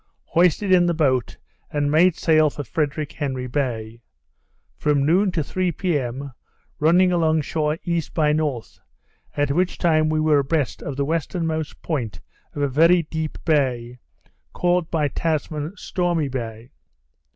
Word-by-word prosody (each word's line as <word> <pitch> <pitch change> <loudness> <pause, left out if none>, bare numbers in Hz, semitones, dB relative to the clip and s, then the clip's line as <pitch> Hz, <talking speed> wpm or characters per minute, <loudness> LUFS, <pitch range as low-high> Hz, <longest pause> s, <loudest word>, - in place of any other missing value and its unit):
Hoisted 180 +3 +3
in 175 -1 +5
the 170 - +1
boat, 130 -6 +1 0.3
and 145 -1 0
made 165 +3 +4
sail 155 -3 +3
for 145 - -6
Frederick 150 -1 -2
Henry 135 -5 -3
Bay. 120 -4 -3 0.7
From 145 -2 +1
noon 185 +5 +3
to 160 - 0
three 185 +4 -1
p.m. 140 -6 -2 0.5
running 180 +4 +4
along 160 -2 +2
shore 150 +1 -1
E. 170 -1 0
by 150 -2 +2
N., 155 +1 +1 1.0
at 145 -1 +1
which 180 +5 0
time 155 -3 +2
we 155 0 +1
were 155 -2 +3
abreast 140 -1 -1
of 140 - -5
the 140 - 0
westernmost 160 0 -2
point 130 -10 -3 0.4
of 145 - -1
a - - +3
very 165 +6 +4
deep 160 0 -4
bay, 125 -6 0 0.5
called 175 -1 +1
by 155 -3 +1
Tasman, 155 +3 -3
Stormy 175 -5 -1
Bay. 115 -1 -6
155 Hz, 145 wpm, -22 LUFS, 140-165 Hz, 1.0 s, in